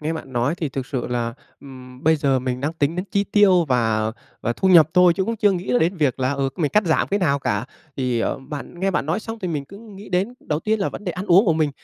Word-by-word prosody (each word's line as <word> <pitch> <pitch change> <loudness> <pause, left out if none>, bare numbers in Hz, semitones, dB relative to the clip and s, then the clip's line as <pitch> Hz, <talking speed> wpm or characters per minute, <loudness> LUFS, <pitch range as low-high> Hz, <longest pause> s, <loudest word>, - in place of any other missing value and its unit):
nghe 155 +2 -2
bạn 145 -5 -7
nói 125 +5 0
thì 165 -3 -3
thực 135 -1 -5
sự 130 -3 -3
là, 120 -1 -2 0.3
ừm, 130 -2 -12
bây 160 +1 +4
giờ 140 -3 +1
mình 125 0 -3
đang 145 +4 -1
tính 160 0 -1
đến 180 - -2
chi 200 0 +1
tiêu 195 -4 +4
và 110 -3 +1 0.3
và 120 - -1
thu 190 - 0
nhập 165 -5 +7
thôi, 180 -1 +6
chứ 190 - 0
cũng 230 +2 -2
chưa 210 -1 +3
nghĩ 175 -9 -3
đến 170 +4 +1
việc 140 -5 0
là, 130 +1 +1
ừ, 140 -1 -1
mình 150 -5 0
cắt 210 0 +3
giảm 160 - +1
cái 200 - 0
nào 150 -7 +1
cả. 105 -5 -1 0.3
Thì, 125 -3 0
ờ, - - -1
bạn 140 +4 -8
nghe 195 +1 +1
bạn 150 -5 -1
nói 165 +7 -1
xong 225 +1 -7
thì 185 - -4
mình 150 -4 -3
cứ 200 +8 -13
nghĩ 210 -2 -12
đến 190 +6 -1
đầu 150 0 -2
tiên 220 +4 0
là 195 - +1
vấn - - -9
đề 180 - -2
ăn 185 +4 -6
uống 185 +4 +6
của 175 - +3
mình. 155 -2 +1
155 Hz, 285 wpm, -22 LUFS, 130-185 Hz, 0.3 s, nhập